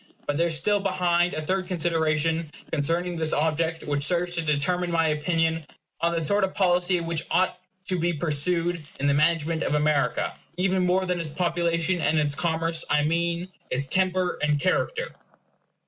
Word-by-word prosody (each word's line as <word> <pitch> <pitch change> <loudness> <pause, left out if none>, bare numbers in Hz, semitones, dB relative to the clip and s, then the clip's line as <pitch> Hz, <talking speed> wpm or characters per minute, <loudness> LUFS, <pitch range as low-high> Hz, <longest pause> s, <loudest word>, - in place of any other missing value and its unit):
But 145 - -1
there 170 +3 +2
is 165 -2 +2
still 205 +6 +2
behind 180 -2 +1
a 155 - -3
third 185 +3 -1
consideration 160 -2 0 0.2
concerning 170 +4 0
this 160 -1 0
object 160 +2 0
which 145 -1 -1
serves 175 +3 +2
to 170 - -1
determine 165 +4 0
my 165 -2 +2
opinion 165 +1 0 0.4
on 170 +1 +1
the 165 -1 -1
sort 200 +5 +2
of 190 - -1
policy 180 -1 +2
which 165 -1 -1
ought 185 0 +1 0.3
to 185 -1 -1
be 170 +1 +1
pursued 170 +2 +1 0.2
in 140 - -1
the 140 - +3
management 160 +2 +1
of - - 0
America, 150 -1 +1 0.2
even 185 0 +1
more 185 +1 +2
than 180 -1 -1
its 165 -2 -3
population 170 +1 0
and 155 0 +2
its 150 -2 +1
commerce 165 +1 0
I 150 - +3
mean 170 +3 -1 0.2
its 135 +2 -1
temper 185 +2 +1
and 150 -1 +1
character. 460 - -1
170 Hz, 175 wpm, -25 LUFS, 155-180 Hz, 0.4 s, the